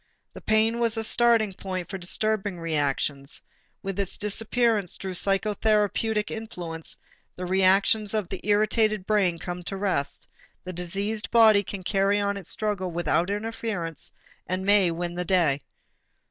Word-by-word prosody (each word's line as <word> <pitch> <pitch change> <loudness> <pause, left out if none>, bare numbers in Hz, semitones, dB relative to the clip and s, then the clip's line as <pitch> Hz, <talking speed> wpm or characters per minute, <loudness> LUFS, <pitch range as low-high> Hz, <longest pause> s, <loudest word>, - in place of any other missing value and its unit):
The - - -10
pain 220 +2 +2
was 230 -1 0
a 225 - -1
starting 225 -2 +4
point 185 -2 -5
for 195 +1 -6
disturbing 200 +1 -1
reactions; 145 -3 -1 0.4
with 195 0 -4
its 195 -2 -2
disappearance 220 -1 0
through 190 -1 -5
psychotherapeutic 210 +2 +1
influence, 175 -8 -6 0.4
the 180 - -5
reactions 195 +3 +3
of 210 -4 -1
the - - -5
irritated 215 -1 +2
brain 195 -5 +2
come 175 +1 -6
to 195 +2 -4
rest, 185 -8 -1 0.4
the 185 - -6
diseased 195 +5 -2
body 220 -3 +6
can 195 -1 -7
carry 195 +1 +2
on 200 0 0
its 195 -4 -7
struggle 205 -4 -2
without 175 +1 0
interference 205 -5 -3 0.4
and 185 +1 -2
may 200 -3 +5
win 170 +1 -3
the 180 +1 -2
day. 165 -6 +2
195 Hz, 145 wpm, -26 LUFS, 180-215 Hz, 0.4 s, body